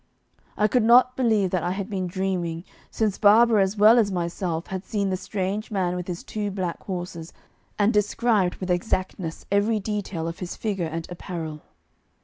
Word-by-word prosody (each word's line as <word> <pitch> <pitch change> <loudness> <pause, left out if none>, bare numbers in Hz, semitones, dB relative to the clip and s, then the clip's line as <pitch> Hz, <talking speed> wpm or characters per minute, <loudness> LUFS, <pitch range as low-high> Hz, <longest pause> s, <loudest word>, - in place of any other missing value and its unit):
I 210 - +3
could 245 +3 +2
not 245 +3 +5
believe 220 -7 +2
that 185 - 0
I 175 - -1
had 195 0 -4
been 190 -4 -3
dreaming, 175 -3 -2 0.3
since 215 -3 -1
Barbara 220 +1 +6
as 195 +2 0
well 220 +4 +7
as 205 -3 +2
myself 170 -1 -2
had 190 0 -5
seen 200 -3 -1
the - - +1
strange 195 +3 -3
man 185 -4 -1
with 180 -1 -5
his 175 -2 -5
two 210 -1 -3
black 185 -3 -3
horses, 175 -3 -6 0.4
and 210 +2 +3
described 210 -2 +2
with 185 -1 -4
exactness 180 -2 -2
every 210 +2 +2
detail 200 -5 -3
of 165 - -6
his 180 -2 -5
figure 195 -6 -2
and 165 +1 -4
apparel. 165 -4 -6
190 Hz, 175 wpm, -25 LUFS, 175-210 Hz, 0.4 s, well